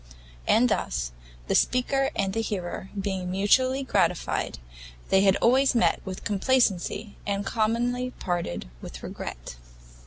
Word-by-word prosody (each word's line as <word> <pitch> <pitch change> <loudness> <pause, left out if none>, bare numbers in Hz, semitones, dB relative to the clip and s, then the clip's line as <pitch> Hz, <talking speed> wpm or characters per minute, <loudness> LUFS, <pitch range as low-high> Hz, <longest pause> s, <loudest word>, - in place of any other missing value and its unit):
And 245 +3 +5
thus, 60 - -1 0.3
the - - -1
speaker 270 +2 +2
and 195 -1 0
the 225 - 0
hearer 190 -3 -4
being 190 -2 -2
mutually 255 +8 +2
gratified, 260 - 0 0.5
they 190 - +5
had 195 -1 +5
always 260 +3 +3
met 235 - +3
with 190 -1 -7
complacency, 205 -1 +1
and 200 0 -1
commonly 240 +4 0
parted 175 - -3
with - - -9
regret. - - -7
205 Hz, 125 wpm, -26 LUFS, 190-245 Hz, 0.5 s, And